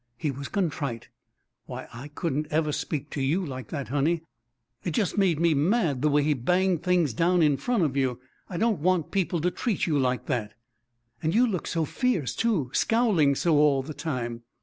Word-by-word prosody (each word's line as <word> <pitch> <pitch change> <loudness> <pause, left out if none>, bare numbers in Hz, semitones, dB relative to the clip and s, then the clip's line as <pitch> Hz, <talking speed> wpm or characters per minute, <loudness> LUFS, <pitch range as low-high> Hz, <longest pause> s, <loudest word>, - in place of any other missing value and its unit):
He 145 +3 -1
was 140 +1 -6
contrite. 145 - -2 0.6
"Why, - - -7
I 120 +5 -8
couldn't 150 -1 -2
ever 155 0 +1
speak 145 0 -3
to 145 - -3
you 160 +8 +1
like 130 -4 -6
that, 140 -6 -5
honey; 155 +5 +1 0.6
it 170 -4 -3
just 205 - 0
made 185 -7 +2
me 170 -1 +3
mad 155 - +1
the 150 - +3
way 145 0 +3
he 150 +1 +2
banged 180 +6 +1
things 175 -7 +2
down 170 +6 +3
in 150 -2 +4
front 235 - 0
of 140 -4 0
you. 130 -3 0 0.3
I 175 - -4
don't 220 -2 +1
want 175 0 +1
people 180 -3 0
to 180 +2 +1
treat 225 +2 -1
you 150 -4 +1
like 125 -1 0
that." 115 -6 -2 0.7
"And 160 +3 0
you 245 +2 +5
look 195 -8 -2
so 165 -2 0
fierce, 180 - 0
too 190 - 0
scowling 205 - +3
so 160 +1 +2
all 145 -2 +4
the 155 +3 -7
time." 120 -7 -4
155 Hz, 195 wpm, -26 LUFS, 140-180 Hz, 0.7 s, you